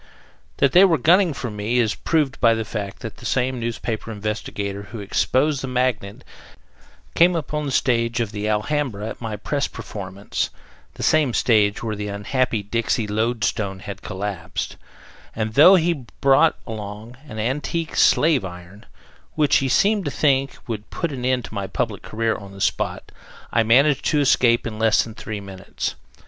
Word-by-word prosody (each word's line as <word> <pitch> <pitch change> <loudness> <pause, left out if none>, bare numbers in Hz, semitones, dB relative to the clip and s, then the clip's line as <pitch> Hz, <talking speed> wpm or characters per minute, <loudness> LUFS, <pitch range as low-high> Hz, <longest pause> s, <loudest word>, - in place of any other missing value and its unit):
That 140 - +3
they 180 +6 +7
were 175 -5 +5
gunning 175 +6 +4
for 125 -4 -5
me 105 +4 -1
is 115 -3 +2
proved 150 -5 -1
by 115 -2 +5
the 110 -1 -3
fact 100 -2 -5
that 115 - -6
the - - -12
same 130 0 0
newspaper 115 -1 -4
investigator 105 -1 -4
who 115 - -7
exposed 130 +8 +1
the 135 - -4
Magnet, 125 -6 -1 0.9
came 175 +1 +5
upon 150 -1 -2
the - - -2
stage 115 -2 +1
of 115 -3 -1
the 105 0 -3
Alhambra 110 0 -1
at - - -9
my 110 -2 -4
press 140 +7 -2
performance 100 0 -5 0.5
the - - -6
same 150 -6 +3
stage 105 -3 +2
where 110 -2 -2
the 105 0 -4
unhappy 105 +2 -1
Dixie 110 +1 -1
lode 110 +3 -1
stone 100 -3 -1
had 95 +1 -8
collapsed 95 -3 -4 0.6
and 110 -1 -2
though 160 - +8
he 165 -7 0
brought 140 +4 +4
along 110 +2 -7
an 110 - -8
antique 145 +8 -2
slave 150 -6 +4
iron, 90 +2 -10 0.5
which 150 -2 +4
he 135 - 0
seemed 200 - +3
to - - 0
think 140 -1 +1
would 110 -4 -5
put 170 -3 -3
an 130 -3 -5
end 125 -1 +1
to - - -11
my 100 -2 -3
public 115 -2 -3
career 115 +1 -1
on 100 -1 -9
the 100 - -11
spot, - - -1 0.4
I 115 - +4
managed 135 +6 +4
to 150 - +2
escape 120 -4 +3
in 110 -2 -5
less 110 -1 +4
than 115 - -9
three 105 -1 -6
minutes. 95 -1 -5
115 Hz, 175 wpm, -22 LUFS, 105-135 Hz, 0.9 s, though